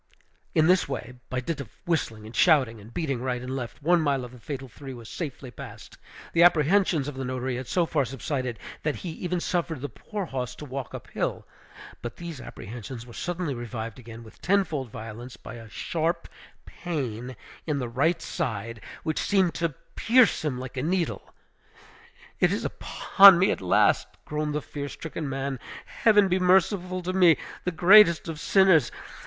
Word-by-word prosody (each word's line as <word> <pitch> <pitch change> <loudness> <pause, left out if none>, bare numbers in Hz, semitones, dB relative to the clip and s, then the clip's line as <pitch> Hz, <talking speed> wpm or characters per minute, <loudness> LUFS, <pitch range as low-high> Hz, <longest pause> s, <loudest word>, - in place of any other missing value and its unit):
In 160 -1 +5
this 180 -2 +4
way, 125 -2 -5 0.2
by 130 -1 -2
dint 145 +2 -3
of 125 - -9 0.2
whistling 115 -10 -1
and 110 +2 -10
shouting, 130 - +4
and 110 +3 -13
beating 140 -5 -2
right 125 -1 -1
and 125 +2 -5
left, 130 +2 -6
one 175 +2 +4
mile 140 -4 0
of 120 - -11
the 125 - -13
fatal 135 +2 -6
three 135 +3 -9
was 115 -2 -11
safely 135 -5 -6
passed. - - -10 0.4
The 170 - +4
apprehensions 170 -2 +4
of 145 - -4
the 135 0 -5
notary 130 0 -2
had 130 -1 -6
so 175 -2 +2
far 150 -3 +1
subsided, 130 -1 -3 0.2
that 150 -2 -1
he 180 - -6
even 180 +2 -3
suffered 170 -4 -1
the 145 - -4
poor 210 -3 -5
horse 125 -5 -4
to 150 - -9
walk 135 -2 -6
up - - -8
hill; - - -2 0.6
but 120 -2 -6
these 170 -6 -7
apprehensions 120 +1 -8
were 120 - -12
suddenly 175 -1 -3
revived 115 -1 -6
again 115 -1 -10
with 110 - -16
tenfold 170 -10 +1
violence 115 +3 -8
by - - -10
a 115 -2 -10
sharp 165 - -2 0.4
pain 130 -8 -4 0.3
in 150 -2 0
the 125 -3 -2
right 155 +8 +1
side, 115 -2 -3 0.2
which 155 -1 -1
seemed 190 -4 +2
to 165 -4 -2 0.2
pierce 245 -5 +4
him 145 -5 -1
like 130 +1 -7
a - - 0
needle. 170 +3 -1 1.1
"It - - +4
is - - -1
upon 195 -2 +6
me 185 - +3
at - - -3
last!" 90 - +3 0.2
groaned 150 0 -2
the 150 - -2
fear 145 -1 -6
stricken 160 -1 -5
man. 135 -1 -3 0.3
"Heaven 210 -3 +4
be 185 0 +1
merciful 185 0 +2
to 185 +1 -2
me, 180 -4 +6 0.3
the 180 - +1
greatest 175 +1 +7
of 160 -2 -5
sinners! 190 -2 +4
145 Hz, 180 wpm, -26 LUFS, 125-175 Hz, 1.1 s, greatest